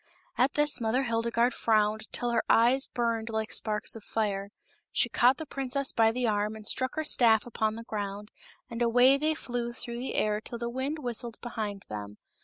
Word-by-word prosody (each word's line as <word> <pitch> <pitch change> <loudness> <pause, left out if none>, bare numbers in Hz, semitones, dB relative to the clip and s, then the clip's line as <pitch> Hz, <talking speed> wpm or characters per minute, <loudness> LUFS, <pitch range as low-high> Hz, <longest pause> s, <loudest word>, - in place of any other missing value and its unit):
At 255 +3 +2
this 295 -3 +2
Mother 235 +4 +1
Hildegarde 235 0 +1
frowned 215 -1 +1
till 240 0 -1
her 235 - +2
eyes 245 +4 +4
burned 230 -2 -1
like 220 -1 -2
sparks 210 0 0
of 225 - -9
fire. 200 -3 -2 0.4
She - - +2
caught 250 +2 +4
the 315 - -6
princess 275 0 -1
by 225 -1 +4
the 250 +2 -1
arm 210 0 0
and 215 -1 -11
struck 260 +4 -1
her 315 - -1
staff 225 -7 +4
upon 220 -2 -1
the 230 - -7
ground, 205 -2 -5 0.4
and 235 0 -6
away 245 +3 +5
they 310 +1 +1
flew 240 -4 -4
through 235 0 -5
the 255 - -4
air 210 0 +1
till 235 - -7
the 235 0 -3
wind 265 +5 -2
whistled 240 -4 -4
behind 215 -5 -5
them. 105 -1 -7
235 Hz, 195 wpm, -29 LUFS, 215-250 Hz, 0.4 s, away